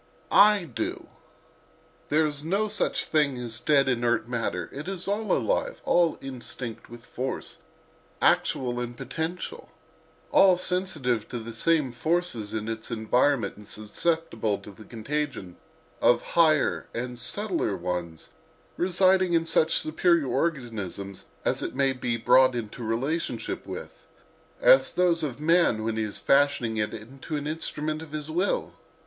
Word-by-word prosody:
I 205 Hz, -2 st, +6 dB
do. 115 Hz, -9 st, -5 dB, 1.0 s
There 155 Hz, +1 st, +3 dB
is 145 Hz, -1 st, -3 dB
no 195 Hz, +7 st, 0 dB
such 205 Hz, -, -1 dB
thing 145 Hz, -4 st, +1 dB
as 120 Hz, -2 st, -3 dB
dead, 140 Hz, -3 st, +3 dB
inert 120 Hz, -2 st, +1 dB
matter: 120 Hz, -2 st, -2 dB
it 145 Hz, +5 st, -7 dB
is 190 Hz, -2 st, -4 dB
all 210 Hz, +2 st, -1 dB
alive; -, -, 0 dB
all 170 Hz, -2 st, +3 dB
instinct 125 Hz, -3 st, -6 dB
with 120 Hz, 0 st, -12 dB
force, 130 Hz, +2 st, -5 dB, 0.6 s
actual 125 Hz, -2 st, +2 dB
and 120 Hz, 0 st, -5 dB
potential; 165 Hz, +3 st, -5 dB, 0.6 s
all 185 Hz, -2 st, +6 dB
sensitive 165 Hz, -, 0 dB
to 125 Hz, -, -4 dB
the 115 Hz, 0 st, -7 dB
same 150 Hz, +2 st, +2 dB
forces 155 Hz, -6 st, -1 dB
in 110 Hz, 0 st, -3 dB
its 110 Hz, 0 st, -4 dB
environment 115 Hz, +1 st, +1 dB
and 105 Hz, -1 st, -12 dB
susceptible 110 Hz, -1 st, -1 dB
to 105 Hz, -, -11 dB
the 105 Hz, +2 st, -14 dB
contagion 120 Hz, -5 st, -4 dB, 0.4 s
of 120 Hz, -, +4 dB
higher 155 Hz, -4 st, +3 dB
and 125 Hz, +1 st, -4 dB
subtler 175 Hz, -, -1 dB
ones 85 Hz, -2 st, -5 dB, 0.5 s
residing 185 Hz, 0 st, +3 dB
in 165 Hz, -1 st, +2 dB
such 160 Hz, -1 st, +3 dB
superior 165 Hz, 0 st, +2 dB
organisms 115 Hz, -, -3 dB, 0.2 s
as -, -, +1 dB
it -, -, -4 dB
may 135 Hz, 0 st, +2 dB
be 120 Hz, -2 st, -2 dB
brought 125 Hz, +2 st, +5 dB
into 115 Hz, 0 st, -5 dB
relation 135 Hz, +9 st, -1 dB, 0.3 s
with, -, -, -8 dB, 0.6 s
as -, -, +5 dB
those 175 Hz, -2 st, +2 dB
of 140 Hz, -4 st, -3 dB
man 160 Hz, -8 st, +3 dB
when 110 Hz, 0 st, -1 dB
he 110 Hz, -, -1 dB
is 105 Hz, -1 st, -5 dB
fashioning 135 Hz, -5 st, +2 dB
it 105 Hz, 0 st, 0 dB
into 130 Hz, +8 st, -7 dB
an 145 Hz, -1 st, -3 dB
instrument 155 Hz, 0 st, -3 dB
of 155 Hz, -2 st, -11 dB
his 155 Hz, 0 st, -4 dB
will. 180 Hz, +5 st, 0 dB
135 Hz, 140 wpm, -26 LUFS, 115-165 Hz, 1.0 s, I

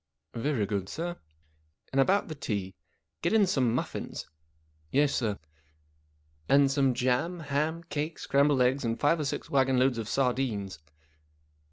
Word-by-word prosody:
" 80 Hz, -, -51 dB
Very 120 Hz, -2 st, 0 dB
good, 100 Hz, -1 st, -3 dB
sir." 175 Hz, +2 st, -4 dB, 0.4 s
" 75 Hz, 0 st, -38 dB
And 135 Hz, -, +4 dB
about 195 Hz, +8 st, +2 dB
the 155 Hz, -, -5 dB
tea. 100 Hz, -9 st, -3 dB, 0.5 s
Get 170 Hz, -, +1 dB
in 215 Hz, -2 st, +5 dB
some 125 Hz, -9 st, +1 dB
muffins." -, -, -4 dB, 0.3 s
" 75 Hz, 0 st, -38 dB
Yes, 145 Hz, 0 st, +3 dB
sir." 110 Hz, -5 st, -1 dB, 0.6 s
" 75 Hz, 0 st, -38 dB
And 140 Hz, -1 st, +5 dB
some 135 Hz, -2 st, +2 dB
jam, 130 Hz, +8 st, 0 dB
ham, 155 Hz, +3 st, -1 dB
cake, 155 Hz, -1 st, -4 dB
scrambled 140 Hz, -1 st, +3 dB
eggs, 130 Hz, +3 st, +1 dB
and 115 Hz, -1 st, -1 dB
five 160 Hz, +3 st, +3 dB
or 150 Hz, -, -1 dB
six -, -, -3 dB
wagonloads 130 Hz, -2 st, +2 dB
of 110 Hz, -, -4 dB
sar¬ 125 Hz, +1 st, +2 dB
dines." 105 Hz, -, -3 dB
130 Hz, 165 wpm, -29 LUFS, 100-145 Hz, 0.6 s, in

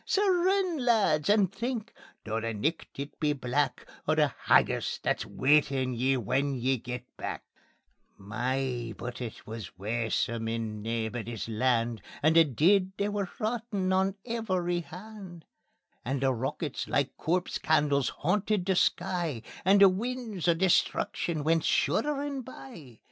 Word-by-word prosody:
Sae 405 Hz, +1 st, +1 dB
rin, 365 Hz, -4 st, +2 dB
lads, 205 Hz, -, +3 dB
and 205 Hz, -2 st, +4 dB
think, 235 Hz, +2 st, -3 dB, 0.3 s
though 110 Hz, 0 st, -2 dB
the 115 Hz, -1 st, -3 dB
nicht 155 Hz, +10 st, -2 dB
it 140 Hz, +1 st, -7 dB
be 150 Hz, -2 st, +2 dB
black, 135 Hz, +1 st, -1 dB, 0.2 s
O' -, -, +3 dB
the -, -, +2 dB
haggis -, -, +3 dB
that's -, -, -1 dB
waitin' 135 Hz, -2 st, +2 dB
ye 130 Hz, +3 st, +1 dB
when 135 Hz, +4 st, 0 dB
ye 130 Hz, +1 st, +1 dB
get 125 Hz, +1 st, -6 dB
back." -, -, -5 dB, 0.7 s
My! 120 Hz, +2 st, -2 dB
but 125 Hz, +1 st, -6 dB
it 115 Hz, -3 st, -7 dB
wis 110 Hz, -6 st, -8 dB
waesome 115 Hz, +2 st, -1 dB
on 110 Hz, -2 st, -3 dB
Naebuddy's 115 Hz, 0 st, -3 dB
Land, 115 Hz, 0 st, +1 dB, 0.2 s
And 160 Hz, +2 st, +4 dB
the 165 Hz, -, +9 dB
deid 185 Hz, -, +2 dB
they 200 Hz, +1 st, 0 dB
were 205 Hz, -3 st, -2 dB
rottin' 215 Hz, -4 st, -1 dB
on 190 Hz, +1 st, +2 dB
every 185 Hz, -7 st, -1 dB
hand. 180 Hz, -1 st, -10 dB, 0.6 s
And 135 Hz, +2 st, -2 dB
the 135 Hz, -1 st, +3 dB
rockets 135 Hz, +4 st, -3 dB
like 140 Hz, -1 st, 0 dB
corpse 180 Hz, +2 st, -1 dB
candles 145 Hz, -3 st, +2 dB
hauntit 200 Hz, +3 st, +1 dB
the 190 Hz, 0 st, +2 dB
sky, 170 Hz, -9 st, 0 dB, 0.2 s
And 195 Hz, +2 st, +5 dB
the 195 Hz, -, +10 dB
winds 220 Hz, -2 st, -3 dB
o' 170 Hz, -, +5 dB
destruction 170 Hz, -2 st, +1 dB
went 165 Hz, +1 st, +3 dB
shudderin' 285 Hz, -2 st, 0 dB
by. 230 Hz, -, -11 dB
155 Hz, 145 wpm, -29 LUFS, 125-200 Hz, 0.7 s, the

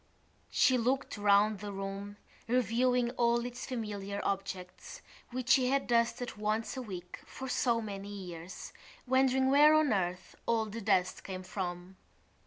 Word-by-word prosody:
She 255 Hz, -2 st, +4 dB
looked 255 Hz, +3 st, 0 dB
round 205 Hz, 0 st, +3 dB
the 205 Hz, 0 st, -6 dB
room, 195 Hz, +1 st, -6 dB, 0.3 s
reviewing 245 Hz, +1 st, +2 dB
all 235 Hz, 0 st, +2 dB
its 245 Hz, 0 st, -6 dB
familiar 205 Hz, -5 st, -4 dB
objects 190 Hz, -2 st, -5 dB, 0.3 s
which 250 Hz, -1 st, -4 dB
she 255 Hz, -2 st, +5 dB
had 275 Hz, +1 st, +1 dB
dusted 235 Hz, 0 st, 0 dB
once 215 Hz, +3 st, -1 dB
a 260 Hz, -, -4 dB
week 180 Hz, -6 st, -8 dB
for 265 Hz, -, -8 dB
so 240 Hz, -2 st, +1 dB
many 200 Hz, -2 st, -6 dB
years, 180 Hz, -3 st, -8 dB, 0.3 s
wondering 260 Hz, 0 st, +3 dB
where 300 Hz, +2 st, +7 dB
on 310 Hz, -6 st, +4 dB
earth 185 Hz, -1 st, -2 dB
all 225 Hz, -1 st, +2 dB
the 215 Hz, +2 st, -6 dB
dust 185 Hz, -2 st, +1 dB
came 185 Hz, -1 st, -6 dB
from. 180 Hz, -1 st, -5 dB
215 Hz, 145 wpm, -32 LUFS, 195-250 Hz, 0.3 s, where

